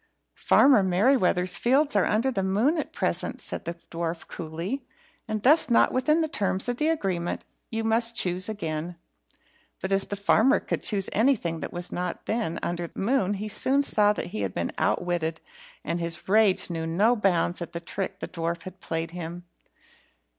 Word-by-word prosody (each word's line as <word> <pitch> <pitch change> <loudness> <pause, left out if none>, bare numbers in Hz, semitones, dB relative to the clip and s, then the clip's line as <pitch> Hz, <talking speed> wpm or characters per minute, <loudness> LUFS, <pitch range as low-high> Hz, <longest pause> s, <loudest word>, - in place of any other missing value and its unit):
"Farmer 265 -6 +5
Merryweather's 185 -2 +2
fields 270 +2 +2
are 200 - +3
under 230 +5 +1
the 195 - -1
moon 215 - +1
at - - -4
present," - - -1
said - - -5
the 170 - -4 0.2
dwarf, 165 0 -4
coolly, 170 - -5 0.4
"and 215 -1 -3
thus 300 +3 +5
not 235 - +4
within 305 +5 +2
the 320 - +1
terms 195 -7 -1
of 245 -1 -1
the 305 - +1
agreement. 185 - -2 0.2
You 225 0 -2
must 230 +1 +1
choose 185 -1 +1
again." 170 -4 -4 0.8
But 190 - -4
as 195 0 +3
the 205 - -4
farmer 220 +7 +3
could - - -3
choose 195 -3 0
nothing 210 -9 +2
that - - -5
was 175 0 -6
not 180 -1 -4
then 215 -7 -1
under 175 0 -2
the - - -18
moon, 205 -2 +1
he 210 +2 -4
soon 270 +6 +1
saw 210 -6 +3
that 195 - -5
he 105 - -2
had 95 -2 -3
been 85 - -2
outwitted, 170 -2 0 0.4
and 170 - -2
his 170 -1 -3
rage 200 -3 +3
knew 165 -1 -3
no 205 +9 +3
bounds 180 -4 +1
at 170 - -6
the 170 - -3
trick 195 +3 -5
the - - -3
dwarf 170 -1 -3
had 185 0 -10
played 165 -1 -3
him. 175 0 -7
190 Hz, 180 wpm, -26 LUFS, 170-225 Hz, 0.8 s, Farmer